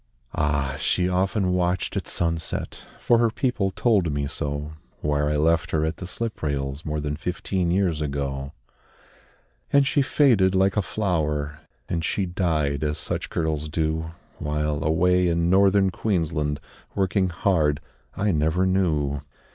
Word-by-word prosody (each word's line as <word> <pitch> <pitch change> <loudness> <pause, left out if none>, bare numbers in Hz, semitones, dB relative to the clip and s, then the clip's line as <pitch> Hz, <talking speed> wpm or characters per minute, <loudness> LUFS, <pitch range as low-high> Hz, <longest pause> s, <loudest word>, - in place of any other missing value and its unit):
Ah! 70 -2 0
she 90 -1 +1
often 95 +1 +1
watched 90 0 0
at - - -2
sunset 80 -1 -2
For 120 - +3
her 115 -1 +4
people 110 -4 0
told 95 -5 +2
me 70 0 -1
so 75 +2 -3 0.3
Where 75 0 +1
I 75 - 0
left 80 +2 +2
her 80 -1 +1
at 80 - -2
the 90 - -6
slip 115 +4 -4
rails 70 -1 -2
More 75 0 -2
than 75 0 -2
fifteen 90 +2 -2
years 90 -4 +1
ago. 70 -2 -3 1.2
And 140 -1 +5
she 140 +1 +2
faded 120 -8 +3
like 95 +1 +3
a 105 - +3
flower, 75 -8 -1 0.3
And 85 -1 -2
she 95 +4 0
died, 80 -6 0
as 75 0 -1
such - - -3
girls 75 -2 -2
do, 80 +1 -1 0.3
While, 75 0 -1
away 90 +3 +3
in 85 0 +1
Northern 95 0 +4
Queensland, 80 -8 -1 0.4
Working 95 -1 +1
hard, 80 -4 +1 0.4
I 100 +1 +1
never 80 +3 +1
knew. 75 -7 +1
85 Hz, 145 wpm, -24 LUFS, 75-95 Hz, 1.2 s, And